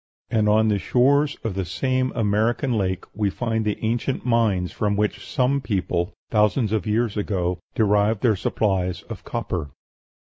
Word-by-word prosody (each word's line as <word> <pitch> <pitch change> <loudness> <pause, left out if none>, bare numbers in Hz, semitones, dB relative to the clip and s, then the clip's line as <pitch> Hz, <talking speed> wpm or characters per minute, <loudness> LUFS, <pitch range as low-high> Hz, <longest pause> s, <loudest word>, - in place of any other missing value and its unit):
And 110 -2 +2
on 110 +1 +4
the 105 -1 +1
shores 140 +7 +2
of 110 -4 -2
this 95 -2 -3
same 130 +5 0
American 115 +4 +1
lake 95 -3 -1
we 105 -1 0
find 115 +1 -1
the 105 -1 -1
ancient 120 +4 -1
mines 110 -7 +2
from 105 -1 0
which 105 +1 -1
some 140 +1 +1
people, 90 -6 -1 0.2
thousands 105 +1 +2
of 110 -4 -1
years 110 0 +1
ago, 90 -4 -1 0.2
derived 105 0 +2
their 115 -4 +4
supplies 95 -2 -1
of - - -9
copper. 80 -5 -3
105 Hz, 155 wpm, -23 LUFS, 100-120 Hz, 0.2 s, on